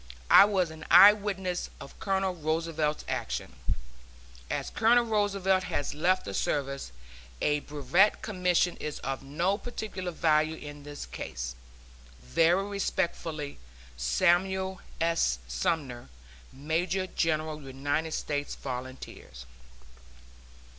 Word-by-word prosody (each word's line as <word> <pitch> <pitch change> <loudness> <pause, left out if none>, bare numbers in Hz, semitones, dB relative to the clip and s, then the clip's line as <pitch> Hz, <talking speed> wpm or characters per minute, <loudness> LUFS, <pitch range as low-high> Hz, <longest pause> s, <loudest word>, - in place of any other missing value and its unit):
I 195 - +10
was 190 -5 +1
an 160 0 -10
eye 195 +4 +10
witness 190 -4 -3
of - - -12
Colonel 195 -2 0
Roosevelt's 160 -1 -1
action. 60 - -3 0.9
As - - -3
Colonel 235 +2 +4
Roosevelt 200 -4 +1
has 145 - -2
left 180 +5 +1
the 100 - -5
service, 140 - -2 0.5
a 150 0 +2
Brevet 150 +8 +2
Commission 180 -3 +1
is 150 -1 -5
of 135 0 -3
no 170 +9 -1
particular 215 -6 -5
value 155 -1 +2
in 145 -1 -9
his 145 0 -7
case. - - -6 0.7
Very 165 - +2
respectfully, 170 -6 -2 0.4
SAMUEL 180 - +1 0.2
S. 165 - +2
SUMNER, 120 - -2 0.4
Major 165 +7 -1
General 155 -3 -1
United 145 +4 -2
States 145 -1 -2
Volunteers. 125 - -7
160 Hz, 105 wpm, -29 LUFS, 145-190 Hz, 0.9 s, I